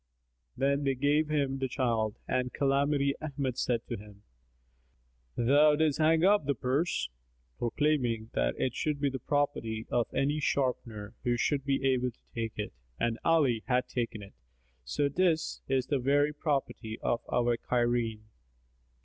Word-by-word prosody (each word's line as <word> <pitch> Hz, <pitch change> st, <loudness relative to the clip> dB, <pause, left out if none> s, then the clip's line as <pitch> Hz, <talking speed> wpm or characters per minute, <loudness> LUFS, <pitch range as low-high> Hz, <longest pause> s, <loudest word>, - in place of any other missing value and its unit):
Then 140 Hz, +1 st, +1 dB
they 135 Hz, -1 st, +1 dB
gave 145 Hz, +4 st, +2 dB
him 140 Hz, -3 st, 0 dB
the 135 Hz, -, 0 dB
child 115 Hz, -5 st, 0 dB
and 125 Hz, 0 st, 0 dB
Calamity 140 Hz, 0 st, +2 dB
Ahmad 140 Hz, -4 st, -3 dB
said 120 Hz, -2 st, 0 dB
to 120 Hz, -, -4 dB
him, 105 Hz, 0 st, -14 dB, 1.1 s
"Thou 145 Hz, +5 st, +5 dB
didst 155 Hz, -1 st, +1 dB
hang 160 Hz, +1 st, +4 dB
up 200 Hz, -7 st, +4 dB
the 140 Hz, -, +2 dB
purse, 135 Hz, +9 st, 0 dB, 0.5 s
proclaiming 120 Hz, -3 st, 0 dB
that -, -, +1 dB
it 130 Hz, -, 0 dB
should 150 Hz, +2 st, -1 dB
be 140 Hz, -1 st, +1 dB
the 130 Hz, -, -4 dB
property 120 Hz, -6 st, -1 dB
of 120 Hz, -1 st, +2 dB
any 140 Hz, +3 st, +1 dB
sharper 120 Hz, -7 st, -1 dB
who 120 Hz, -2 st, +1 dB
should 140 Hz, +3 st, 0 dB
be 135 Hz, -1 st, 0 dB
able 125 Hz, -1 st, +2 dB
to 120 Hz, -, -17 dB
take 115 Hz, -2 st, -3 dB
it, 105 Hz, -, -4 dB, 0.3 s
and 115 Hz, -1 st, 0 dB
Ali 145 Hz, -9 st, +3 dB
hath 125 Hz, -1 st, +1 dB
taken 115 Hz, -3 st, -3 dB
it; 100 Hz, -, -13 dB, 0.5 s
so 100 Hz, -, 0 dB
'tis 165 Hz, +2 st, +1 dB
the 135 Hz, +1 st, +1 dB
very 145 Hz, +3 st, +2 dB
property 135 Hz, -7 st, -2 dB
of 120 Hz, -, +1 dB
our 120 Hz, -1 st, +2 dB
Cairene." 120 Hz, -2 st, 0 dB
130 Hz, 150 wpm, -30 LUFS, 120-145 Hz, 1.1 s, Thou